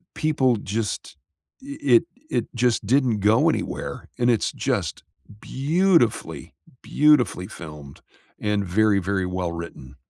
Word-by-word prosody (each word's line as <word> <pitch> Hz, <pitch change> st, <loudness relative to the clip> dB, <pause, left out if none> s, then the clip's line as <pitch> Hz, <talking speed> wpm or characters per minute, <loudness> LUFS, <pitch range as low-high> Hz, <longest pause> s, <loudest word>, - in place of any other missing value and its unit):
people 135 Hz, -5 st, +2 dB
just 105 Hz, 0 st, -4 dB, 0.5 s
i 280 Hz, +1 st, -8 dB, 0.2 s
i 115 Hz, -, +7 dB, 0.3 s
it -, -, -1 dB
just 120 Hz, -3 st, +1 dB
didn't 125 Hz, -2 st, +2 dB
go 105 Hz, +3 st, +3 dB
anywhere, -, -, -4 dB
and 120 Hz, 0 st, +2 dB
it's 115 Hz, -4 st, +1 dB
just -, -, -2 dB, 0.4 s
beautifully, 160 Hz, -, 0 dB, 0.3 s
beautifully 145 Hz, -11 st, +2 dB
filmed 75 Hz, -6 st, -11 dB, 0.4 s
and 105 Hz, -1 st, -1 dB
very, 105 Hz, +2 st, +3 dB
very 95 Hz, 0 st, -1 dB
well 90 Hz, -1 st, -3 dB
written. 85 Hz, -6 st, -9 dB
110 Hz, 120 wpm, -23 LUFS, 95-130 Hz, 0.5 s, i